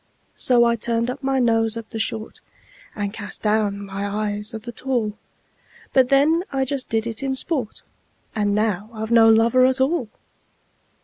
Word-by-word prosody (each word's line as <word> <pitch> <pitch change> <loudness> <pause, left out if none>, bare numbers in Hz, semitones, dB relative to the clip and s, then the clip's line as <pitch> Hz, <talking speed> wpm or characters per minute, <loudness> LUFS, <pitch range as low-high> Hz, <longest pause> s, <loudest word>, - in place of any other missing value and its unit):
So 245 -2 +4
I 235 0 +3
turned 230 +2 0
up 280 - -8
my 270 -1 0
nose 225 -2 +2
at 225 -1 -8
the 225 - -5
short, 220 0 -3 0.5
And 205 -1 -3
cast 205 -2 -5
down 210 -2 0
my 195 0 -5
eyes 210 +1 -2
at 220 - -7
the 240 - -6
tall; 235 -4 -2 0.8
But 260 -2 +4
then 300 +5 +3
I 270 -1 0
just 270 -1 -4
did 225 0 0
it 230 +2 -4
in 270 -1 -1
sport 265 -5 -3 0.5
And 205 -2 0
now 210 -1 -1
I've 220 +1 -5
no 225 -1 +7
lover 230 +3 +4
at 260 +1 +3
all! 265 -3 +1
230 Hz, 175 wpm, -22 LUFS, 215-260 Hz, 0.8 s, no